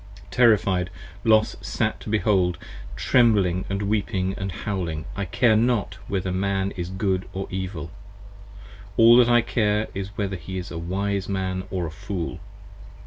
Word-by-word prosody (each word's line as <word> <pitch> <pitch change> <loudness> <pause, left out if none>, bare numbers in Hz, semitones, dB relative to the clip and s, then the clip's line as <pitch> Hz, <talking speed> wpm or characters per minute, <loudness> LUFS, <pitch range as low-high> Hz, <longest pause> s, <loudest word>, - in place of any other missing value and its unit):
Terrified 100 -7 +3 0.3
Los 110 -1 +4
sat - - -1
to - - -8
behold, 100 -5 +2 0.4
trembling 100 -7 +3
& - - -12 0.2
weeping 100 -2 0 0.2
& - - -5
howling. 85 -7 -2
I 100 - -2
care 110 +4 +3
not 115 -3 +1
whether 95 -2 -2
a - - -3
Man 95 +1 0
is 90 -1 -5
Good 95 -1 -1
or 95 +1 -3
Evil; 95 -3 -4 1.1
all 115 +1 +8
that 120 -1 +6
I 120 0 +6
care 105 -3 +1
55 - - -11
Is 100 +1 -8
whether 100 -2 -1
he 95 +3 -7
is 90 - -6
a 85 - -4
Wise 100 +3 -2
Man 95 -1 -2
or 90 -2 -2
a 80 - -5
Fool. 85 +2 -5
95 Hz, 160 wpm, -24 LUFS, 90-105 Hz, 1.1 s, all